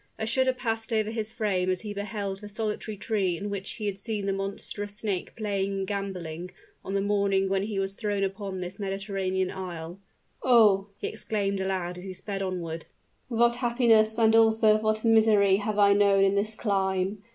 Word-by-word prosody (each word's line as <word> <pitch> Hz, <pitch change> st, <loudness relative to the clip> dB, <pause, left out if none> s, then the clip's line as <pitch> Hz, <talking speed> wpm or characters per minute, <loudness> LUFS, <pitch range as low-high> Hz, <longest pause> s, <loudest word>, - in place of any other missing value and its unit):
A 220 Hz, -, -2 dB
shudder 260 Hz, +3 st, +2 dB
passed 225 Hz, -2 st, -3 dB
over 220 Hz, -1 st, +1 dB
his 220 Hz, -1 st, -3 dB
frame 200 Hz, -6 st, 0 dB
as 185 Hz, -1 st, 0 dB
he 210 Hz, -2 st, -5 dB
beheld 200 Hz, -1 st, -4 dB
the 210 Hz, -, -8 dB
solitary 215 Hz, 0 st, -4 dB
tree 190 Hz, -5 st, 0 dB
in 205 Hz, +3 st, -5 dB
which 195 Hz, -1 st, -4 dB
he 215 Hz, -, -6 dB
had 200 Hz, -1 st, -2 dB
seen 210 Hz, -1 st, -3 dB
the 195 Hz, -, 0 dB
monstrous 200 Hz, +1 st, -5 dB
snake 205 Hz, -4 st, -3 dB
playing 200 Hz, -3 st, -1 dB
and 195 Hz, 0 st, -2 dB
gamboling, 180 Hz, -4 st, -4 dB, 0.3 s
on 195 Hz, -, -4 dB
the 195 Hz, -, +2 dB
morning 200 Hz, -1 st, +2 dB
when 195 Hz, 0 st, +1 dB
he 205 Hz, 0 st, -3 dB
was 195 Hz, 0 st, -1 dB
thrown 205 Hz, -1 st, -2 dB
upon 195 Hz, -1 st, -3 dB
this 180 Hz, +3 st, -6 dB
Mediterranean 195 Hz, -1 st, -2 dB
isle. 175 Hz, -1 st, -6 dB, 0.4 s
"Oh!" 210 Hz, -6 st, +5 dB
he -, -, -6 dB
exclaimed 200 Hz, -2 st, -2 dB
aloud, 185 Hz, -2 st, -2 dB
as -, -, -10 dB
he 190 Hz, -1 st, -6 dB
sped 195 Hz, +1 st, -5 dB
onward, 170 Hz, -4 st, -4 dB, 0.4 s
"what 235 Hz, 0 st, +2 dB
happiness 235 Hz, -3 st, +3 dB
and 225 Hz, -1 st, +4 dB
also 220 Hz, -1 st, +5 dB
what 215 Hz, +1 st, 0 dB
misery 215 Hz, -3 st, +5 dB
have 210 Hz, +1 st, -2 dB
I 200 Hz, -1 st, +6 dB
known 200 Hz, -1 st, +4 dB
in 195 Hz, 0 st, +3 dB
this 210 Hz, +2 st, 0 dB
clime. 195 Hz, -1 st, 0 dB
200 Hz, 185 wpm, -27 LUFS, 195-215 Hz, 0.4 s, I